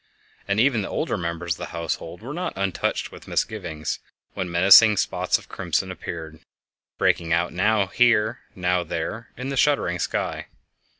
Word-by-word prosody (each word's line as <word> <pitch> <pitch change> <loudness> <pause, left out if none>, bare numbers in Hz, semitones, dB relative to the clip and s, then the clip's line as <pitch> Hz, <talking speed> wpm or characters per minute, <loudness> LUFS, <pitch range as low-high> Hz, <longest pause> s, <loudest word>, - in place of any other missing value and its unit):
And 100 +1 +1
even 120 -2 +3
the 100 - -4
older - - -1
members 85 0 -2
of - - -11
the - - -4
household 85 +1 -4
were 135 +5 -6
not 180 +3 -3
untouched 95 -1 -1
with - - -13
misgivings 85 -8 -2 0.3
when 90 - -3
menacing 100 +5 +7
spots - - +1
of - - -15
crimson 95 -1 -2
appeared, 80 -4 -7 0.6
breaking 80 -1 +1
out 85 +1 +1
now 105 +2 +2
here, 115 +3 +3 0.2
now 90 -1 +1
there, 85 +8 -4
in 125 +2 -4
the 135 - -3
shuddering 120 -11 +2
sky. - - -2
95 Hz, 160 wpm, -24 LUFS, 85-110 Hz, 0.6 s, menacing